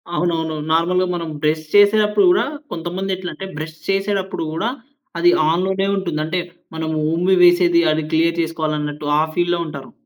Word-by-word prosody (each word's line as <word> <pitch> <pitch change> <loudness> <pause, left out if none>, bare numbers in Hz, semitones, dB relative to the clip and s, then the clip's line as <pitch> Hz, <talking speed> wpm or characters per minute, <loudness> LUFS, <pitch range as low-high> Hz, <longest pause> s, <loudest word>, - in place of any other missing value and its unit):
అవునవునవును. 160 -3 -1
నార్మల్‌గా, 180 +3 +2
మనం 170 -2 -4
బ్రష్ 155 +1 0
చేసేప్పుడు 210 - +5
కూడా, 365 - +2 0.3
కొంతమంది 180 +3 -3
ఎట్లా 185 -1 -6
అంటే 195 - -7
బ్రష్ 155 +1 -6
చేసేటప్పుడు 195 -2 -1
గూడా, 165 +9 -1 0.5
అది 175 +1 +4 0.2
ఆన్‌లోనే 190 +3 0
ఉంటుంది. 170 -5 -3
అంటే, 175 +3 -1 0.4
మనం 160 0 -3 0.2
ఉమ్మి 180 +3 +2
వేసేది, 175 -1 +5
అది 155 +1 -1
క్లియర్ 165 +1 +2
చేసుకోవాలి 160 -2 -2
అన్నట్టు, 150 0 -5
ఆ - - +4
ఫీల్‌లో 175 0 +1
ఉంటారు. 140 -4 -8
170 Hz, 155 wpm, -19 LUFS, 160-190 Hz, 0.5 s, చేసేప్పుడు